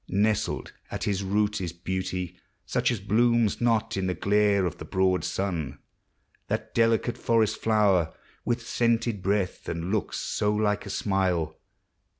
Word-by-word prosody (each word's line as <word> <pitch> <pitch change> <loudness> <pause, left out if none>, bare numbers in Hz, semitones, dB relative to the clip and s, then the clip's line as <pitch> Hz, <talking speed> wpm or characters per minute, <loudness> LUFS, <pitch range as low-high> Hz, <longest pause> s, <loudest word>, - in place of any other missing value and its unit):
Nestled 105 +2 0 0.2
at - - -4
his 100 -1 0
root 105 +1 +1
Is 85 -3 -3
beauty, 90 0 -3 0.3
such - - +1
as 120 - -1
blooms 115 +2 +2
not 115 -2 +2
in 95 -1 0
the 90 - -1
glare 100 -1 +3
Of 85 - -3
the - - -6
broad 95 -1 +1
sun. 80 -8 -2 0.7
Thai - - +2 0.2
delicate 115 +1 +2
forest 110 -2 +2
flower 100 -7 +3 0.3
With 120 -1 -2
scented 115 -3 +1
breath, 95 -1 -1
and 85 +2 -3
look 110 -1 -1
so 105 0 0
like 105 -1 0
a - - -6
smile. 90 -6 0
100 Hz, 150 wpm, -27 LUFS, 95-110 Hz, 0.7 s, glare